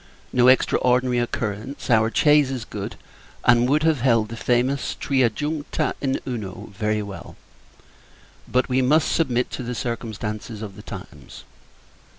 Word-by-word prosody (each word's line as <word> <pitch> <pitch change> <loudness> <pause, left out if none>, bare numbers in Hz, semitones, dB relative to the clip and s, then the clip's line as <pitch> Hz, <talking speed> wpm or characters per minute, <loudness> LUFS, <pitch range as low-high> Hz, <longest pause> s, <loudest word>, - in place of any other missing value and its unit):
No 125 0 +4
extraordinary 125 -1 +3
occurrence. 115 +2 -3
Our 110 -1 +4
chaise 150 -1 +4
is 130 -4 -4
good, 100 -2 -6 0.5
and 120 +1 +5
would 150 +2 +3
have 160 -5 +2
held 115 -4 +3
the 115 - -6
famous 125 +3 0
"Tria 130 -4 +2
juncta 150 +6 -2
in 135 -1 0
Uno," 105 -4 -5
very 105 +1 0
well: 100 -1 -9 1.1
but, 125 0 +1
we 130 0 +2
must 150 +5 +3
submit 125 -6 +1
to - - -5
the 125 0 -4
circumstances 110 -2 -4
of 100 -3 -7
the - - -10
times. - - -10
125 Hz, 145 wpm, -23 LUFS, 110-130 Hz, 1.1 s, and